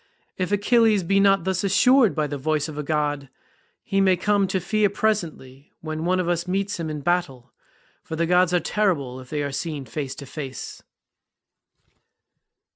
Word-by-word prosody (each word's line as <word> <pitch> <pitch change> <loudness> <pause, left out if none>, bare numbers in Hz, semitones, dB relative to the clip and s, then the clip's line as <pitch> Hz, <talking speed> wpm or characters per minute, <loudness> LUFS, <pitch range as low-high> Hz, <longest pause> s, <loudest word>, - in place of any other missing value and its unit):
If 185 +1 -3
Achilles 210 0 +3
be 195 +3 +2
not 195 -2 +4
thus 190 +1 -1
assured 225 - +4
by 155 - 0
the 145 -1 -5
voice 155 +2 0
of 155 - -8
a 150 - -3
god, 145 -2 -2 0.5
he 195 0 0
may 190 -2 +4
come 200 +1 +1
to 190 0 -1
fear 210 +3 +1
presently 170 -11 -3
when 155 0 -4
one 185 +1 +1
of 180 - -1
us 175 0 -1
meets 195 +1 -2
him 165 -1 -3
in 150 -1 -5
battle, 145 -7 -2 0.5
for 160 - -6
the 170 +1 0
gods 180 +1 +3
are 180 - +3
terrible 160 -9 -1
if 130 -1 -13
they 150 -1 -2
are 140 - -3
seen 145 0 -4
face 140 -2 -5
to 140 - -9
face." 135 -2 -7
170 Hz, 180 wpm, -23 LUFS, 150-195 Hz, 0.5 s, not